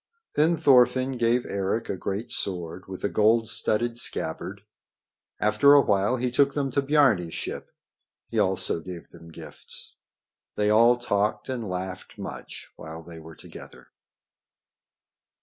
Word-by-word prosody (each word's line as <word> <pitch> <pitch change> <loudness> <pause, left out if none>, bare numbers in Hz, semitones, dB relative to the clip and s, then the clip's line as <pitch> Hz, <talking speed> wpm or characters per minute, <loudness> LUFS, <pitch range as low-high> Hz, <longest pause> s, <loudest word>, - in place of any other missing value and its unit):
Then 160 +3 +2
Thorfinn 130 -3 +4
gave 120 -1 +1
Eric 100 +3 -2
a - - -2
great 100 +4 -5
sword 90 -1 -3
with 95 -1 -8
a - - +2
gold 110 +2 +2
studded 115 +1 0
scabbard. 95 +1 -2 0.8
After 105 +7 +5
a 145 - +8
while 105 +2 +1
he 125 0 -1
took 140 +2 +2
them 140 -2 -1
to 140 - +1
Biarni's 135 - +2
ship. - - -5 0.6
He - - -2
also - - +1
gave 85 0 -9
them 85 - -14
gifts. 80 - -12 0.6
They 105 0 +1
all 115 +3 +5
talked 105 -1 -1
and 120 -6 -4
laughed 90 0 -6
much - - -9
while 80 +1 -9
they 85 0 -11
were 80 0 -12
together. - - -13
105 Hz, 140 wpm, -25 LUFS, 95-125 Hz, 0.8 s, a